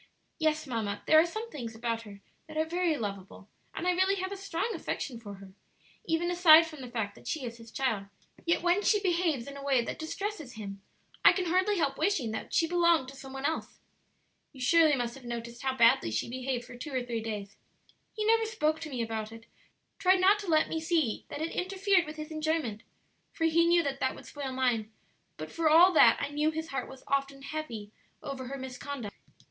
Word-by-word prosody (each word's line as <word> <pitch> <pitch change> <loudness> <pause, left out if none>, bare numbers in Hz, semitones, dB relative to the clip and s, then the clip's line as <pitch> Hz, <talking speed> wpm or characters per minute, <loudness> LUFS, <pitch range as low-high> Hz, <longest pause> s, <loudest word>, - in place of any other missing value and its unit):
"Yes, 310 -1 +1
mamma, 220 -6 -3
there 315 - +7
are 330 - +4
some 440 +6 -6
things 235 -6 -6
about 230 0 -2
her 200 -3 -12 0.3
that 310 0 -8
are 315 - +2
very 340 -1 0
lovable, 200 -2 -6 0.3
and 360 - -3
I - - +5
really 375 +2 +2
have 375 0 -3
a - - -3
strong 390 0 -2
affection 275 - -4
for 205 -3 -9
her, 195 -1 -13 0.5
even 340 0 0
aside 335 -2 +8
from 310 -4 -10
the 250 - -7
fact 220 -4 -3
that - - -15
she 300 -5 -2
is 235 -1 -6
his 230 -1 -13
child; 225 -7 -1 0.4
yet 335 0 +1
when 355 +3 +3
she 420 0 +3
behaves 340 -9 0
in 280 - -8
a 280 - -8
way 270 -4 +2
that - - -5
distresses 320 - -4
him 200 -3 -7 0.4
I - - +9
can 370 - -1
hardly 375 +4 +2
help 275 -5 0
wishing 315 - +1
that 220 - -5
she 330 - +3
belonged 340 -5 +3
to 275 - -11
some 270 0 -10
one 270 +1 -5
else. 320 +2 -2 0.8
"You 265 - -13
surely 310 +3 +5
must 240 -2 -2
have 270 - -12
noticed 235 0 -6
how 265 -1 -1
badly 230 - +5
she 110 0 -1
behaved 255 0 -3
for - - -11
two 270 +5 -7
or 255 -2 -1
three 235 -2 -3
days. 210 -2 -5 0.6
He 430 -1 -3
never 450 +1 +4
spoke 315 -9 0
to 310 - -6
me 250 -4 -2
about 220 -1 -4
it, 225 0 -12 0.5
tried 370 -1 +4
not 395 +3 +5
to 405 - -7
let 310 -2 +3
me 320 - -3
see 320 -8 0
that 290 - -6
it 330 - -3
interfered 375 -1 +1
with 305 - -7
his 305 +1 -7
enjoyment 310 -8 -1 0.5
(for 345 - -4
he 330 +1 +4
knew 340 0 +4
that 275 -2 -3
that 260 - 0
would - - -12
spoil 280 -2 -5
mine), 245 -4 0 0.5
but - - -7
for 330 -2 +1
all 345 +4 +7
that - - +7
I 285 - -2
knew 300 +1 +1
his 320 +1 -4
heart 270 - -3
was 265 0 -12
often 275 0 -1
heavy 250 -9 -6 0.3
over 265 -2 -5
her 275 +2 -5
misconduct. 260 -3 -6
285 Hz, 220 wpm, -30 LUFS, 235-335 Hz, 0.8 s, I